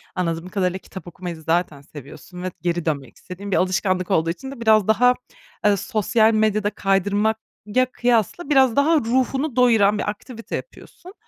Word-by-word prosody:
anladığım 170 0 -2
kadarıyla 185 -2 -1
kitap 185 -2 -11
okumayı 175 0 -7
zaten 160 -3 -1
seviyorsun. 150 +5 -11
Ve 185 - -3
geri 175 0 -1
dönmek 140 -6 -3
istediğin 195 +2 -9
bir - - +2
alışkanlık 185 0 0
olduğu 165 -3 +2
için 265 +11 -5
de 270 -4 -10
biraz 215 -3 +4
daha, 250 +3 +4 0.5
e, 205 -1 +4
sosyal 220 +3 +1
medyada 215 -1 +1
kaydırmak 205 +2 0 0.3
ya, 255 +5 +2
kıyasla 245 - 0
biraz 265 -5 +4
daha 295 +4 +3
ruhunu 260 +3 -1
doyuran 225 -5 +4
bir 205 - -2
aktivite 225 +3 -7
yapıyorsun. 370 -6 -10
205 Hz, 160 wpm, -22 LUFS, 180-230 Hz, 0.5 s, biraz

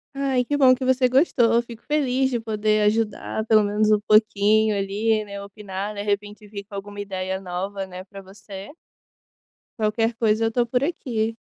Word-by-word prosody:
Ai 270 -2 0
que 290 - -1
bom 260 -3 +6
que 255 +1 -5
você 255 0 +3
gostou, 250 -4 +3
eu 235 - +4
fico 235 -1 -11
feliz 265 -3 +1
de 245 -2 -1
poder 215 -1 0
ajudar 220 0 0
pelo 215 -1 +5
menos 210 +1 +1
um 210 - +4
pouquinho 215 0 +3
ali, 210 +2 0
né, 200 -1 -7
opinar 200 0 -6
de 205 - -4
repente 205 +1 -3
vir 200 -1 -8
com 205 0 -11
alguma 205 +1 -7
ideia 190 -1 -4
nova, 195 +2 -4
né, 185 0 -9
para 195 +1 -12
você 195 0 -11 1.1
qualquer 225 +2 0
coisa 225 -1 +1
eu 225 - 0
tô 240 +1 +1
por 250 +2 -1
aqui. 230 -8 -2
215 Hz, 185 wpm, -23 LUFS, 200-235 Hz, 1.1 s, bom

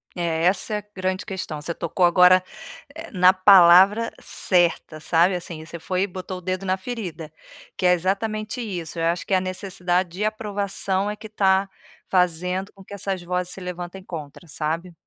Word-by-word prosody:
É, 165 -2 -1
essa 190 +4 +1
é - - 0
a - - -13
grande 185 0 -2
questão, 180 -7 -6
você 170 +3 -4
tocou 170 +2 -2
agora 180 +1 +6 0.7
na 185 -1 +6
palavra, 190 +3 +6
eh, - - -13
certa, 175 -3 +1
sabe, 170 +4 +2
assim, 170 -3 -6
você 170 +1 -9
foi 185 +3 -2
e - - -1
botou 185 0 -7
o - - -15
dedo 185 +1 -3
na 185 0 0
ferida, 185 -7 -6 0.5
que 185 - -2
é 180 - +6
exatamente 215 +6 -2
isso, 180 -8 -5
eu 165 - 0
acho 170 +1 -1
que - - -2
a 185 - +2
necessidade 185 -1 -2
de 190 +5 -3
aprovação 205 -2 -1
é - - -5
que 215 +1 -10
está 195 -2 +2 0.4
fazendo 180 +1 0
com 195 - -15
que 195 - -12
essas 195 -1 -3
vozes 180 +1 -2
se 190 - -9
levantem 180 +1 -7
contra, 160 -2 -9
sabe. 165 +3 -4
185 Hz, 185 wpm, -23 LUFS, 175-195 Hz, 0.7 s, agora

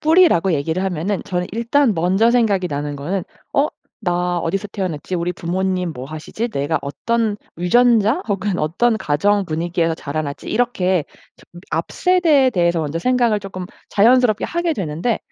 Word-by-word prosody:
뿌리라고 315 - +4
얘기를 160 +4 -1
하면은 190 +2 -1
저는 180 -1 -2
일단 235 +3 +2
먼저 190 +7 +3
생각이 215 -6 +2
나는 145 0 -3
거는 175 +7 -3 0.3
'어 285 +2 +3 0.3
나 180 -2 0
어디서 195 +5 -2
태어났지? 185 -3 -4
우리 175 +1 -1
부모님 180 0 -2
뭐 125 -3 -7
하시지? 155 +10 -5
내가 150 -5 -1
어떤 220 +9 -1 0.2
유전자 230 - +3
혹은 200 -1 -1
어떤 220 +10 +1
가정 200 +5 +1
분위기에서 165 0 -1
자라났지?' 145 -1 -5
이렇게 190 -8 +1 0.3
점 175 - -16
앞세대에 295 - +2
대해서 170 -5 +1
먼저 155 +1 -2
생각을 240 +1 +2
조금 185 -2 -7 0.2
자연스럽게 230 0 +4
하게 345 0 -1
되는데 185 - -2
185 Hz, 355 characters per minute, -20 LUFS, 165-230 Hz, 0.3 s, 뿌리라고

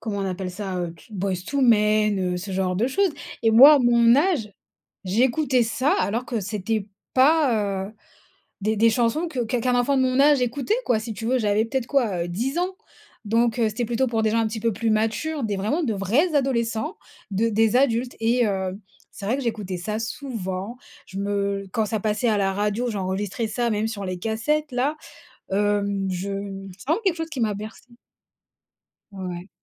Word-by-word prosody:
comment 215 -3 -4
on 195 - -2
appelle 185 0 -4
ça? 190 0 -5
Heu, 170 -1 -4
t - - -19
Boyz 190 -2 -2
II 280 -1 +1
Men, 215 -3 +3 0.2
heu, - - -2
ce 195 +3 -6
genre 185 -1 -1
de 230 +5 +1
choses. 385 +7 +1 0.3
Et 225 - +4
moi, 270 +7 +9
à - - +4
mon 235 -1 +5
âge, 290 - +1 0.5
j'écoutais 250 +6 +2
ça, 255 +6 +1
alors 230 +5 -1
que 235 -3 -2
c'était 205 +1 -2 0.3
pas, 245 -9 +3
heu, 215 - -11 0.7
des 215 +1 0
des 230 +2 +5
chansons 245 +9 +1
que 260 - -3
qu'un 235 +2 -1
qu'un 250 +1 +1
enfant 275 +3 +2
de 260 - +3
mon 255 0 +1
âge 290 -1 +5
écoutait, 250 - 0
quoi. 230 - +3
Si 225 0 -5
tu 225 - -6
veux, 255 +2 +2
j'avais 210 0 +2
peut-être 255 0 -2
quoi, 210 -11 0
heu, - - -6
10 245 - -2
ans. 370 +1 -1 0.5
Donc, 230 +2 +2
heu, 225 - +3
c'était 215 +3 -2
plutôt 240 +3 0
pour 225 -2 0
des 215 - +2
gens 230 - +1
un 225 - +2
petit 220 0 -5
peu 230 -1 +1
plus 225 +3 -2
matures, 225 +8 0
des 205 -2 -1
vraiment 220 - -1
de 240 -8 0
vrais 245 - +1
adolescents, 265 - 0 0.3
de 215 +4 +1
des 220 +2 +3
adultes. 250 -2 +1
Et, 235 +1 +2
heu, 190 -1 -2 0.3
c'est 200 - -9
vrai 240 +6 +1
que - - -3
j'écoutais 200 -6 -3
ça 210 +4 -3
souvent. 220 -3 -5 0.3
Je 190 - -8
me 200 0 -1
quand 220 -1 0
ça 220 -1 -2
passait 215 +3 0
à 215 - +2
la 195 -1 +1
radio, 210 +4 -1
j'enregistrais 200 +2 -2
ça, 235 +2 -1
même 215 +1 0
sur 205 -3 -5
les 185 -1 -4
cassettes-là. 260 - -1 0.6
Hem, 200 -1 0
je 185 +2 -3 0.5
c'est - - -14
vraiment 330 +8 +2
quelque 370 -3 +2
chose 325 0 -4
qui 270 - -4
m'a 215 -3 +1
bercée. 220 +4 -9 1.2
Ouais. 185 -1 -6
225 Hz, 200 wpm, -24 LUFS, 200-250 Hz, 1.2 s, moi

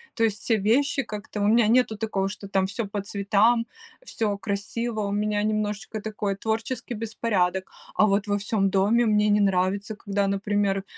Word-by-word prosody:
то 230 - 0
есть 215 -1 -1
все 225 -2 +1
вещи 270 +7 +2
как-то, 210 0 -7
у 205 - +2
меня 225 0 +4
нету 235 -2 +3
такого, 205 -3 -1
что 200 0 -7
там 190 -1 +2
всё 215 +3 -3
по 200 0 -3
цветам, 205 +4 +2 0.4
всё 210 - -2
красиво, 215 +3 -3
у 200 -1 -2
меня 210 0 0
немножечко 215 0 -2
такой 210 -2 -3
творческий 225 +3 -3
беспорядок. 200 -4 -1 0.2
А 215 - +5
вот 200 +1 +1
во 205 0 +1
всём 200 -1 0
доме 210 +5 +3
мне 210 -1 +3
не 205 0 +4
нравится, 200 +2 +1
когда, 200 -1 -1
например, 200 0 0
210 Hz, 175 wpm, -25 LUFS, 200-220 Hz, 0.4 s, А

